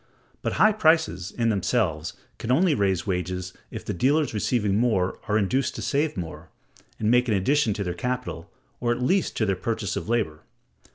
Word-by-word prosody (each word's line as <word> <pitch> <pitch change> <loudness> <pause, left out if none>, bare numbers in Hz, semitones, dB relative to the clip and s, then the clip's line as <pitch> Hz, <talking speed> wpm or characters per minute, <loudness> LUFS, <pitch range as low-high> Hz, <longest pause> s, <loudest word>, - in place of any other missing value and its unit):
But - - -2
high 215 - +5
prices, 160 - +2
in 115 -1 0
themselves, 90 -6 0 0.3
can 120 - -2
only 165 +5 +4
raise 95 -7 +1
wages 90 -1 -3 0.2
if - - -7
the - - -2
dealers, 145 - +2
receiving 105 -1 +1
more, 105 -5 +1
are 105 - +2
induced 125 +7 0
to - - -5
save 145 -1 0
more, 85 -3 -6 0.5
and 110 +1 +1
make 125 +1 +4
an 110 - +2
addition 125 +5 +2
to 105 - -2
their 90 -2 -2
capital, 125 -4 -4 0.3
or 120 -1 0
at 120 - -1
least 185 +8 +1
to 110 - +2
their 100 -2 +1
purchases 100 +1 -2
of - - -5
labor. 105 -11 0
110 Hz, 185 wpm, -25 LUFS, 95-125 Hz, 0.5 s, high